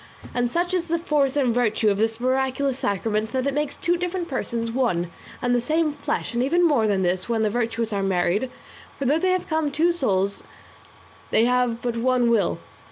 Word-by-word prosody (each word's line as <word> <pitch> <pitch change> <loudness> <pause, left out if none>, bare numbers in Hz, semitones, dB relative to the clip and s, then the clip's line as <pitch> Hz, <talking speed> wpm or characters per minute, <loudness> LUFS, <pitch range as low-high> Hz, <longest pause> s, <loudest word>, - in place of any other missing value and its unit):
And 245 -1 0
such 350 +6 -1
is 355 -2 0
the 335 0 +1
force 295 -5 +1
and 255 -5 +2
virtue 220 -3 +2
of 200 - -1
this 225 +1 0
miraculous 265 +1 0
sacrament 215 +2 -1
that 260 0 0
it 280 - 0
makes 295 0 -1
two 345 0 0
different 355 0 -3
persons 235 -5 -3
one 180 -9 0 0.3
and 245 0 +2
the 245 - +2
same 310 +4 +1
flesh; 285 -3 -3
and 235 - 0
even 340 +7 +3
more 250 -9 +2
than 195 -2 +1
this 185 +3 -1
when 225 -2 +1
the 215 - +1
virtuous 230 -1 -1
are 200 - 0
married; 195 +5 +1 0.5
for 275 - -3
though 295 +5 +3
they 370 - +1
have 370 -1 +1 0.3
two 325 +5 +2
souls 200 - 0 0.9
they 225 - +3
have 245 -1 +1
but 240 -1 -1
one 245 0 +2
will. 205 -6 +2
245 Hz, 200 wpm, -24 LUFS, 220-290 Hz, 0.9 s, even